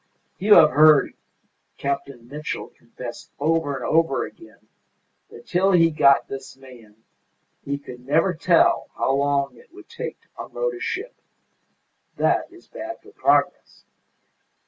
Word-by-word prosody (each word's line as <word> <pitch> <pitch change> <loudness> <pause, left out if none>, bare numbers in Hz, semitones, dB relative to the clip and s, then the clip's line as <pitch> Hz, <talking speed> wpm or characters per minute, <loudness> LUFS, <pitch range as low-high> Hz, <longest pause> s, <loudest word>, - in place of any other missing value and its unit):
You 205 +2 +6
have 155 - +7
heard 155 -1 +5 0.6
Captain 140 -3 -4
Mitchell 150 +3 -6
confess 120 +1 -10
over 155 -1 0
and 130 - -5
over 155 -6 +1
again 335 - -16 0.6
that - - -14
till 190 +2 +1
he 165 -2 +5
got 140 -2 +4
this 135 0 -9
man 115 -5 -17 0.6
he 140 0 -3
could 125 -3 -12
never 160 +7 +2
tell 170 +1 +2
how 135 - 0
long 140 0 0
it 475 - -20
would - - -15
take 470 +1 -7
to - - -32
unload - - -3
a 370 - -8
ship. 390 +5 -4 1.0
That - - 0
is 355 -1 -18
bad 335 +1 -8
for - - -16
progress. - - 0
150 Hz, 140 wpm, -23 LUFS, 135-185 Hz, 1.0 s, have